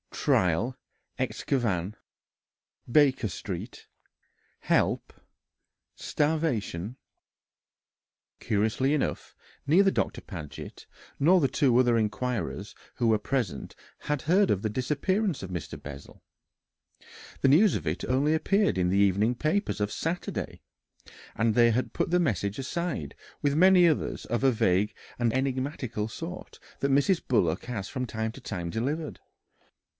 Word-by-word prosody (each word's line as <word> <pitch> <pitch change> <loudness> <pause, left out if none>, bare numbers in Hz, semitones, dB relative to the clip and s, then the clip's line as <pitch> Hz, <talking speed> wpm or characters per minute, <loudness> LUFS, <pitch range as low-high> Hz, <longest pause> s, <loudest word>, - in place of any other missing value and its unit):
trial 95 +8 +1 0.4
excavn... 105 -8 -1 1.0
Baker 135 -5 +4
Street... 95 - -7 0.7
help... - - +1 0.8
starvation." 125 - -1 1.4
Curiously 110 +7 +1
enough, 150 - -2 0.3
neither 190 +7 +5
Doctor - - -1
Paget 80 - -9 0.3
nor 175 +6 +5
the 140 - +3
two 130 -1 +2
other 120 -2 +4
inquirers 115 +2 -2 0.2
who 120 - 0
were 110 -1 +4
present 105 - -3 0.3
had 150 -1 -2
heard 190 +5 +3
of 95 - +1
the 110 - 0
disappearance 150 - 0
of 95 - -6
Mr. 85 -7 -6
Bessel 70 0 -10 1.2
the - - +4
news 175 +9 +5
of 80 - -3
it 75 +4 -2
appeared - - -4
only 145 +4 +3 0.5
in 90 - +2
the 95 - +2
evening 100 +4 +3
papers 160 - -1
of 105 0 -1
Saturday 165 +2 -4 0.7
and 115 0 +2
they 120 +1 +5
had 120 0 -1
put - - -1
the 180 - +4
message 100 - 0
aside 160 - -3 0.3
with 145 -1 +2
many 180 +1 +6
others 155 - -1
of 120 +2 -2
a 135 - +5
vague 105 -3 +1 0.2
and 120 -2 +2
enigmatical 130 -4 -2
sort 165 +10 -8 0.2
that 140 - 0
Mrs. 145 +6 +3
Bullock 100 -10 +1
has 110 -6 -4
from 130 -2 -3
time 110 0 -3
to 135 - -12
time 90 -7 -4
delivered. 145 - -3
125 Hz, 130 wpm, -28 LUFS, 105-150 Hz, 1.4 s, many